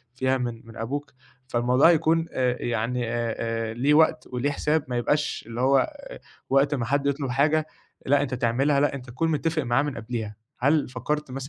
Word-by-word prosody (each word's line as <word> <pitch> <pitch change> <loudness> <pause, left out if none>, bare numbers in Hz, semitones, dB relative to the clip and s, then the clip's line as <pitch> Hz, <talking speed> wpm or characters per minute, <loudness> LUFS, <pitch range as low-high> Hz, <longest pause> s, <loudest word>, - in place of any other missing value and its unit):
فيها 130 0 +1
من 120 -3 -4
من 115 - -12
أبوك. 145 +5 -4 0.3
فالموضوع 125 +5 +4
هيكون 165 0 +3
آآ 125 -1 0
يعني 120 +1 -1
أ - - -3 0.2
آآ 115 -1 -2
ليه 135 +6 +2
وقت 155 0 +3
وليه 125 +3 -1
حساب، 150 +1 0
ما 125 -1 -2
يبقاش 150 +5 0
اللي 115 +1 -4
هو 135 - +3 0.6
وقت 140 +2 +3
ما 125 -4 -1
حد 140 +3 0
يطلُب 140 -2 -1
حاجة، 150 +4 +2 0.4
لأ 145 +1 +3
أنت 130 -2 -2
تعملها، 130 +4 +1
لأ 145 -1 +2
أنت 130 -2 -8
تكون 160 +7 -1
متّفق 160 +1 0
معاه 120 +2 +2
من 145 -2 -4
قبليها. 110 -2 -5 0.2
هل 145 +4 +2
فكّرت 135 +4 -3
مثلًا 135 +1 -6
135 Hz, 190 wpm, -25 LUFS, 120-145 Hz, 0.6 s, فالموضوع